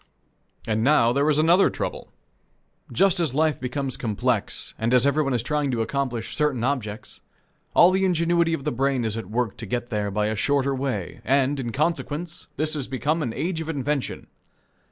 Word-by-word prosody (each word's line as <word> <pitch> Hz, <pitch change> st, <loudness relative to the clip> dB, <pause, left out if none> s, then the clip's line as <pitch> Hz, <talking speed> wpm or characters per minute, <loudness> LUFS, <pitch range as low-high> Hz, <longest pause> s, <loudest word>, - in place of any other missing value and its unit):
And 110 Hz, 0 st, 0 dB
now 120 Hz, -4 st, +4 dB
there 140 Hz, +3 st, +2 dB
is 150 Hz, -, +3 dB
another 170 Hz, +5 st, +5 dB
trouble. -, -, -5 dB, 0.8 s
Just 195 Hz, -2 st, +3 dB
as 155 Hz, -7 st, 0 dB
life 155 Hz, -1 st, +2 dB
becomes 135 Hz, +1 st, -3 dB
complex 115 Hz, 0 st, -1 dB
and 115 Hz, +3 st, +2 dB
as 125 Hz, +1 st, +4 dB
everyone 140 Hz, -2 st, +2 dB
is 115 Hz, -, 0 dB
trying 150 Hz, +2 st, 0 dB
to 120 Hz, -3 st, -1 dB
accomplish 125 Hz, -3 st, -3 dB
certain 150 Hz, -6 st, 0 dB
objects, 110 Hz, -6 st, -3 dB, 0.5 s
all 175 Hz, -, +7 dB
the 190 Hz, +1 st, +1 dB
ingenuity 170 Hz, -2 st, +2 dB
of 140 Hz, -, -8 dB
the -, -, -1 dB
brain 130 Hz, -1 st, 0 dB
is 110 Hz, -1 st, -1 dB
at 115 Hz, -4 st, -6 dB
work 115 Hz, -1 st, -1 dB
to 115 Hz, -1 st, -7 dB
get 120 Hz, +3 st, -3 dB
there 105 Hz, -2 st, -1 dB
by 105 Hz, +1 st, 0 dB
a 110 Hz, +1 st, -1 dB
shorter 140 Hz, +4 st, +1 dB
way, 130 Hz, -9 st, -3 dB
and, 135 Hz, +2 st, +2 dB
in 120 Hz, -3 st, -3 dB
consequence, 160 Hz, +3 st, -2 dB
this 155 Hz, +1 st, +1 dB
has 145 Hz, -4 st, -1 dB
become 145 Hz, +5 st, -1 dB
an 125 Hz, -6 st, -2 dB
age 165 Hz, +6 st, -2 dB
of 160 Hz, -, -6 dB
invention. 145 Hz, -2 st, -2 dB
135 Hz, 185 wpm, -24 LUFS, 120-155 Hz, 0.8 s, all